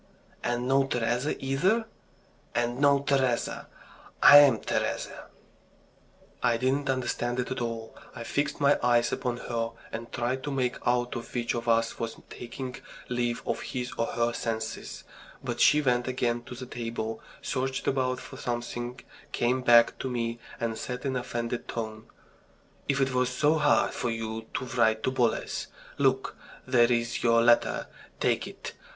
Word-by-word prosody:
"And 120 +1 -1
no 135 +1 +3
Teresa 120 +3 0
either?" 185 +13 +2 0.7
"And 120 +1 0
no 140 -1 +5
Teresa. 135 -4 0 0.6
I'm 145 -5 +9
Teresa." - - -2 1.2
I 115 - +3
didn't 135 +3 0
understand 125 -1 -1
it 125 - -2
at 130 - -2
all. 115 -1 -4 0.2
I 120 - -6
fixed 145 +5 -1
my 140 0 +4
eyes 120 -1 +3
upon 125 -1 -2
her, 115 -2 -3 0.2
and 115 +1 -6
tried 125 +2 -1
to 145 - -4
make 130 -2 0
out 120 0 +1 0.2
which 120 -1 0
of 120 0 -4
us 115 0 +2
was 115 -1 -3 0.2
taking 125 +1 -6 0.3
leave 120 -1 -1
of - - -2
his 125 -1 -4
or 115 - 0
her 120 0 0
senses. 110 -1 -4 0.4
But - - -3
she 150 0 +6
went 125 -2 +2
again 120 -2 -1
to 125 - -8
the 130 +1 -7
table, 115 -2 -4 0.2
searched 130 0 -2
about 130 -1 +1
for - - -10
something, 120 0 -4 0.3
came 125 +2 +1
back 120 -1 +5
to 130 - -3
me, 120 -1 -2 0.2
and 115 -1 -2
said 125 +1 -5
in 135 -1 0
an - - +1
offended 120 0 -4
tone: 110 -2 -5 0.8
"If 140 -1 +2
it 135 -1 +1
was 125 0 +2
so 145 +4 +2
hard 145 -1 +3
for 120 - -2
you 115 -1 -4
to 130 - -1
write 110 -3 +2
to 130 - +1
Boles, 120 -3 0 0.3
look, 135 -1 +2 0.3
there's 120 -2 +2
your 115 0 +4
letter, 120 0 +3 0.3
take - - +1
it! - - -8
120 Hz, 155 wpm, -28 LUFS, 115-130 Hz, 1.2 s, I'm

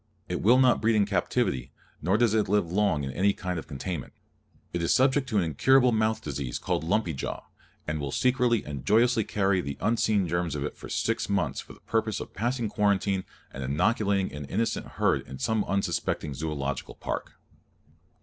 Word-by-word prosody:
It 90 - -3
will 120 +6 +6
not 130 -2 +4
breed 115 0 +3
in 105 -1 +4
captivity, 65 -10 0 0.3
nor 95 +6 +2
does 115 -2 +3
it 110 -3 +1
live 100 -5 +1
long 95 -7 +2
in 65 - -3
any 100 +8 +2
kind 90 -3 -3
of - - -10
confinement. 80 +1 -5 0.6
It 85 - -1
is 85 - +1
subject 130 +1 +3
to 110 - 0
an 95 - +3
incurable 125 - +4
mouth 110 0 +1
disease 70 -4 -3
called - - -1
lumpy 85 0 0
jaw, 65 - -4 0.4
and 75 0 -2
will 70 -1 -3
secretly 125 - +2
and 70 -3 -6
joyously 115 +2 +3
carry 100 -3 +1
the 70 -4 -5
unseen 105 -3 +2
germs 85 -2 -1
of 70 - -2
it 75 - -4
for - - -10
six - - -1
months - - 0
for - - -9
the - - -19
purpose 110 -2 -1
of - - -8
passing 120 +2 -1
quarantine 100 -2 +1 0.3
and 70 - -5
inoculating 100 - +1
an 75 -1 -6
innocent 115 +11 -1
herd - - +2
in 65 - -8
some 110 +10 0
unsuspecting 95 -6 -1
Zoological 70 -2 -4
Park. - - -4
100 Hz, 190 wpm, -27 LUFS, 75-110 Hz, 0.6 s, will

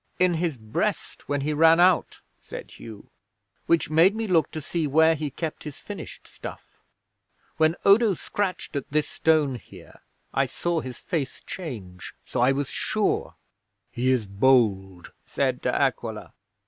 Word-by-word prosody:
'"In 180 -1 +3
his 165 -4 -1
breast 110 +4 -3
when 145 -1 0
he 150 +2 -1
ran 165 +2 +5
out," 180 -1 +3 0.2
said - - -9
Hugh. 110 -3 -12 0.6
"Which 165 -2 +2
made 170 +6 +5
me 225 0 -2
look 175 -6 +2
to 155 - -6
see 155 +1 -2
where 160 +3 +5
he 150 -1 -3
kept 155 +3 -5
his 150 -3 -8
finished - - -9
stuff. - - -11 0.8
When 160 +1 +3
Odo 205 0 +5
scratched 185 -2 -3
at 140 - -3
this 150 +1 0
stone 150 -6 +1
here, - - -15 0.3
I - - +2
saw 175 -1 -1
his 130 -3 -8
face 150 -7 -4
change. 105 - -8
So - - -4
I 125 +2 +5
was 140 0 -1
sure." - - -1 0.6
'"He 125 +2 0
is 125 -4 +2
bold," 100 -4 +2 0.2
said - - -1
De - - 0
Aquila. - - -1
150 Hz, 155 wpm, -25 LUFS, 130-170 Hz, 0.8 s, ran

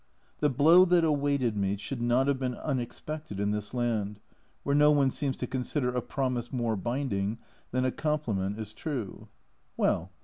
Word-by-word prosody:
The 150 - +3
blow 160 +7 +6
that 175 -1 +4
awaited 140 -6 +1
me 100 0 0
should 120 +5 -5
not 120 +2 +3
have 140 -2 +1
been 125 -2 -2
unexpected 135 -2 -4
in 100 0 +1
this 105 -1 -3
land, 110 -4 -1 0.4
where 140 - 0
no 150 0 +6
one 140 -3 +4
seems 140 -2 -1
to - - -3
con 130 -2 -3
sider 125 -1 0
a 125 - 0
promise 125 -2 -2
more 120 -3 0
binding 110 -2 -2 0.3
than 130 +1 0
a 130 - +1
compliment 110 -12 -1
is 110 -1 -6
true. 125 -7 -5 0.5
Well - - +1
125 Hz, 175 wpm, -29 LUFS, 110-145 Hz, 0.5 s, blow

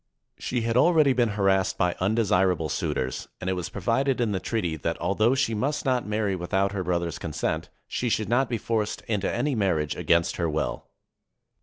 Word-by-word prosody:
She 125 - -2
had 115 0 -1
already 155 -1 +5
been 120 -2 +2
harassed 95 -1 +2
by 90 -1 +2
undesirable 95 -5 +2
suitors, 65 -2 -2
and 90 - -6
it - - +1
was 90 -2 -4
provided 125 +7 0
in 115 -3 +1
the 95 - -1
treaty 90 -7 -2
that, 80 +2 -3
although 105 +8 +2
she 130 -4 +1
must 140 +9 -1
not 125 -4 +1
marry 105 -2 0
without 95 +2 0
her 100 -2 -2
brother's 85 -1 -1
consent, 80 -3 -3 0.2
she 125 - -2
should 110 -2 0
not 125 +4 +2
be 120 - 0
forced 110 -1 -2
into 105 -3 -1
any 145 -1 0
marriage 90 - 0
against 85 0 +1
her 85 -2 0
will. 75 0 -2
100 Hz, 185 wpm, -26 LUFS, 90-115 Hz, 0.2 s, already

